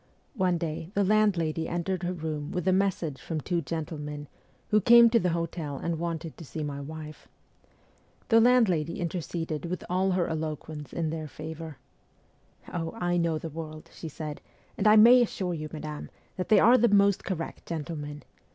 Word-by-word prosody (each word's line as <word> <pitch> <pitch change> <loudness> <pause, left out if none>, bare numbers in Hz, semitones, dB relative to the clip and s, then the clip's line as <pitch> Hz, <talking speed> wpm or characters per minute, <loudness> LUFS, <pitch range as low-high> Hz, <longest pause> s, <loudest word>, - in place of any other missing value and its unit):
One 185 -7 +1
day 160 0 -4
the 200 - +3
landlady 185 -6 +2
entered 175 +2 -2
her 175 0 -1
room 155 -4 -4
with 180 +1 -3
a 185 - +5
message 185 -7 0
from 160 -2 -3
two 170 +3 -1
gentlemen, 150 -1 -5 0.4
who 215 0 +4
came 235 +2 +8
to 230 - +5
the 180 - +1
hotel 165 -3 -3
and 170 +1 -3
wanted 165 -1 -4
to - - -9
see 155 +1 -5
my 140 -1 -4
wife. 155 +1 -9 1.0
The 225 -1 +6
landlady 195 -10 +3
interceded 165 -2 -3
with 180 +1 -4
all 185 +1 +2
her 180 -2 +1
eloquence 155 -3 -5
in 165 -2 -2
their 160 -1 -4
favour. 155 0 -8 0.5
' - - -21
Oh, 165 -2 -3
I 175 -5 0
know 170 -2 +1
the 165 - -6
world,' 155 0 -8
she 160 - -7
said, 150 -1 -6 0.2
' - - -33
and 200 - +1
I 210 - +8
may 240 +4 +8
assure 190 -6 -1
you, 155 -2 -5
madame, 150 -1 -6 0.3
that 185 - -4
they 215 - +7
are 245 +3 +6
the 235 - +4
most 200 -1 +4
correct 165 -4 -5
gentlemen. 150 -2 -5
165 Hz, 180 wpm, -28 LUFS, 155-185 Hz, 1.0 s, came